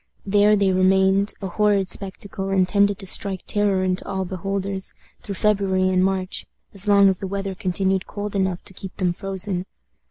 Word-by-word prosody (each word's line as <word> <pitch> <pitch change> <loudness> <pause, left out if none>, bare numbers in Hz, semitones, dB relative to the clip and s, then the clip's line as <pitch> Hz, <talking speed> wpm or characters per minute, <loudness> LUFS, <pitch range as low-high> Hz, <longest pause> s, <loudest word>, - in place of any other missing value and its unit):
There 205 +1 +4
they 200 -2 +2
remained 190 +2 +3
a - - -1
horrid 200 -1 +1
spectacle, 195 0 -2
intended 195 +1 +2
to 200 - -8
strike 190 0 +1
terror 205 -3 +1
into 185 0 -1
all 190 -1 -2
beholders 195 +1 -3 0.3
through 200 - -6
February 195 -2 +1
and 185 0 +2
March, 190 -1 -2 0.3
as 200 +1 +3
long 200 -1 +6
as 190 -2 +1
the 195 - -4
weather 195 0 -3
continued 190 +1 -1
cold 205 0 -5
enough 190 -2 -1
to - - -7
keep 190 0 -9
them 180 -2 0
frozen. 190 0 -2
195 Hz, 170 wpm, -22 LUFS, 185-200 Hz, 0.3 s, long